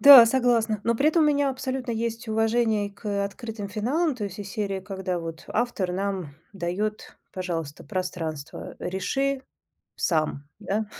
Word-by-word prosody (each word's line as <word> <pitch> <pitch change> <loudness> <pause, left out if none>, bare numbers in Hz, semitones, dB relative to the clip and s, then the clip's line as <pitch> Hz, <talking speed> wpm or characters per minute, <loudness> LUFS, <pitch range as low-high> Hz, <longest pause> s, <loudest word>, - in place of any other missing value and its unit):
Да, 275 -5 +12
согласна. 230 -4 +2
Но 235 - +3
при 275 +6 +4
этом 320 0 +4
у - - +5
меня 285 -2 +3
абсолютно 260 -2 -3
есть 230 +1 -2
уважение 220 -1 +2
к, 210 - -12
э, 200 -1 +1
открытым 215 0 -5
финалам, 265 - +1
то 210 - -3
есть 195 -1 -6
из 200 - -6
серии, 200 -3 -2
когда 190 -2 -3
вот 165 0 -6
автор 210 -6 0
нам 190 -6 -2 0.2
дает, 200 +3 -3 0.2
пожалуйста, 165 -6 -4
пространство, 165 -6 -4
реши 270 +9 0 0.5
сам, 155 -4 0
да, 215 +1 -1
210 Hz, 155 wpm, -26 LUFS, 185-240 Hz, 0.5 s, Да